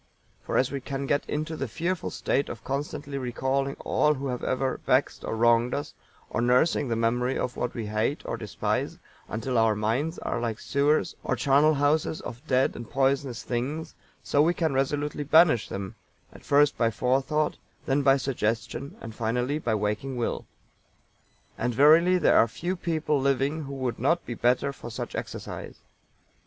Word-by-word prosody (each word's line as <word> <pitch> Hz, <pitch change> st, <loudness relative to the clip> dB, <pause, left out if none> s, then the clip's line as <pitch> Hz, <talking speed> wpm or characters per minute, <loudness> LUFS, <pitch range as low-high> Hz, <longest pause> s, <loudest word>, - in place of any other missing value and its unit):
For -, -, -2 dB
as 130 Hz, -, +2 dB
we 140 Hz, -1 st, -3 dB
can 135 Hz, +1 st, -4 dB
get 145 Hz, +1 st, 0 dB
into 155 Hz, +2 st, -2 dB
the 135 Hz, -3 st, -3 dB
fearful 170 Hz, +9 st, -2 dB
state 140 Hz, -, -1 dB
of -, -, -7 dB
constantly 145 Hz, 0 st, -4 dB
recalling 130 Hz, +2 st, -1 dB
all 150 Hz, 0 st, +2 dB
who 135 Hz, 0 st, -4 dB
have 125 Hz, -1 st, -4 dB
ever 130 Hz, 0 st, -1 dB
vexed 130 Hz, +2 st, +1 dB
or -, -, -3 dB
wronged 120 Hz, +1 st, +3 dB
us, 145 Hz, -, -4 dB, 0.3 s
or -, -, -2 dB
nursing 125 Hz, +4 st, +3 dB
the 115 Hz, -, 0 dB
memory 120 Hz, +3 st, +1 dB
of 125 Hz, -, -2 dB
what 125 Hz, -, -3 dB
we 115 Hz, -3 st, -3 dB
hate 110 Hz, +7 st, -1 dB
or -, -, -2 dB
despise, -, -, -2 dB, 0.3 s
until 115 Hz, +2 st, -1 dB
our 110 Hz, -1 st, +3 dB
minds 120 Hz, -, -1 dB
are -, -, -3 dB
like 115 Hz, -2 st, -2 dB
sewers 145 Hz, +2 st, +1 dB
or -, -, 0 dB
charnel 145 Hz, +3 st, +4 dB
houses 145 Hz, +2 st, +1 dB
of 120 Hz, -, -8 dB
dead 130 Hz, 0 st, +2 dB
and 120 Hz, -, -8 dB
poisonous 135 Hz, -2 st, 0 dB
things, 145 Hz, +7 st, -3 dB, 0.3 s
so 145 Hz, -, +2 dB
we 170 Hz, +3 st, +3 dB
can 160 Hz, -4 st, 0 dB
resolutely 145 Hz, +2 st, -1 dB
banish 150 Hz, -5 st, +5 dB
them, 95 Hz, -1 st, -5 dB, 0.4 s
at -, -, -14 dB
first 145 Hz, +1 st, +3 dB
by 115 Hz, -2 st, +3 dB
forethought, 135 Hz, +6 st, 0 dB, 0.3 s
then 140 Hz, 0 st, +2 dB
by 135 Hz, 0 st, +5 dB
suggestion, 120 Hz, 0 st, -2 dB
and 115 Hz, -, -7 dB
finally 125 Hz, +6 st, -1 dB
by 115 Hz, -7 st, 0 dB
waking 105 Hz, +5 st, -2 dB
will. 120 Hz, -, -2 dB, 1.1 s
And 120 Hz, 0 st, -1 dB
verily 160 Hz, +7 st, +6 dB
there -, -, +4 dB
are 115 Hz, -, +5 dB
few 175 Hz, -, -3 dB
people 160 Hz, -5 st, -1 dB
living 140 Hz, +3 st, 0 dB
who 140 Hz, 0 st, -6 dB
would 130 Hz, -3 st, -3 dB
not 165 Hz, +8 st, +1 dB
be 120 Hz, -, -4 dB
the -, -, -13 dB
better 125 Hz, +3 st, +2 dB
for 120 Hz, -, -9 dB
such 110 Hz, -, -5 dB
exercise. -, -, -6 dB
135 Hz, 175 wpm, -27 LUFS, 120-145 Hz, 1.1 s, verily